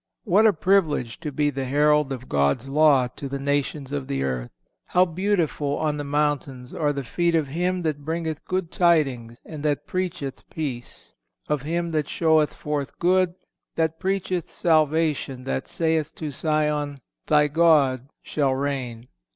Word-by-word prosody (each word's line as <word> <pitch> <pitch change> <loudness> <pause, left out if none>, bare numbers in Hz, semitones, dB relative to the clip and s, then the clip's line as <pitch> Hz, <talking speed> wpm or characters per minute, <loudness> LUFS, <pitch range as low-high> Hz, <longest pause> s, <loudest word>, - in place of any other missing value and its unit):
(497) 190 - -4
What 215 +3 +7
a 180 -7 -2 0.3
privilege 120 -5 -4
to 155 -3 -5
be 145 +1 +1
the 135 -1 -3
herald 150 +1 +3
of 130 -1 -5
God's 70 - +1
law 140 -3 +4
to 135 +2 -8
the 140 - -3
nations 140 0 -1
of 140 -2 -3
the 70 0 -1
earth! 65 -2 -2 0.4
"How 180 +1 +3
beautiful 170 -5 0
on 150 -1 -1
the 145 - -3
mountains 140 -3 -1
are 150 -2 +1
the 140 -1 -4
feet 170 +7 0
of 155 -4 +1
him 180 +4 -1
that 150 -3 -2
bringeth 160 0 -3
good 185 -2 -2
tidings 135 -10 +1
and 155 -2 -8
that 145 -1 0
preacheth 180 -7 -4
peace: 135 -7 -6 0.3
of 150 -2 0
him 170 +3 -2
that 155 -2 -1
showeth 160 -3 +3
forth 145 -2 -4
good, 180 0 +2 0.4
that 160 0 0
preacheth 185 -2 -1
salvation, 155 -5 +1
that 135 0 -3
saith 160 -1 -1
to 155 -2 -5
Sion: 150 -1 0 0.3
Thy 150 -1 +4
God 145 -5 +3
shall 140 -3 0
reign." 130 -4 -3
150 Hz, 160 wpm, -24 LUFS, 135-165 Hz, 0.4 s, What